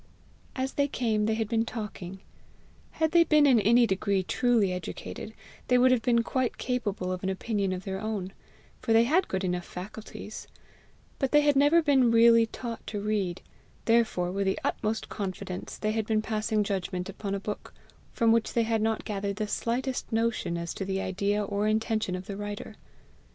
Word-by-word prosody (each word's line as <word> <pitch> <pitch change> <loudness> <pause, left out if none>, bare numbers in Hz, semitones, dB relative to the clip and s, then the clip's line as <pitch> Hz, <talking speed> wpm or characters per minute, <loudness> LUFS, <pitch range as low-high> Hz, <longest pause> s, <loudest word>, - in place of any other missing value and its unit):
As 265 0 -2
they 285 0 +1
came, 220 -6 0
they 220 - +1
had 220 -1 -1
been 225 +1 +1
talking. 210 -5 -6 0.7
Had 320 -1 +1
they 340 0 +6
been 305 -2 +4
in 255 -5 +6
any 235 +4 +5
degree 195 -1 0
truly 225 -3 +2
educated, 180 +4 -6 0.4
they 250 - +4
would 255 +1 +5
have 255 -2 +3
been 235 -1 +2
quite 255 0 -1
capable 210 -7 -2
of 185 -1 -3
an 190 - -1
opinion 200 0 -1
of 185 0 -4
their 190 -1 -4
own, 205 -3 -3 0.5
for 225 - +1
they 225 +1 +6
had 320 +10 +2
good 190 0 -2
enough 180 -1 -1
faculties; 210 +4 -8 0.7
but 270 -3 0
they 295 - +6
had 290 -1 +3
never 290 +4 +5
been 270 -5 +4
really 230 0 +6
taught 230 0 -7
to 210 - -3
read; 200 -4 -2 0.4
therefore, 225 -6 +2
with 195 +1 -1
the 190 - +1
utmost 220 +1 -1
confidence, 185 -2 -5
they 215 - -1
had 220 -1 -1
been 215 -1 +1
passing 215 -1 0
judgment 185 -2 -3
upon 200 0 -4
a - - -2
book 205 +1 -6 0.4
from 230 -1 +3
which 230 -1 +2
they 235 - +3
had 225 -1 0
not 220 0 0
gathered 200 -1 -2
the 210 0 -2
slightest 250 +5 -2
notion 225 -6 0
as 170 -1 -4
to - - -4
the 190 0 -2
idea 200 +2 0
or 200 +1 -1
intention 215 -3 0
of 185 0 -6
the 200 - -6
writer. 205 +1 -6
215 Hz, 190 wpm, -28 LUFS, 195-235 Hz, 0.7 s, they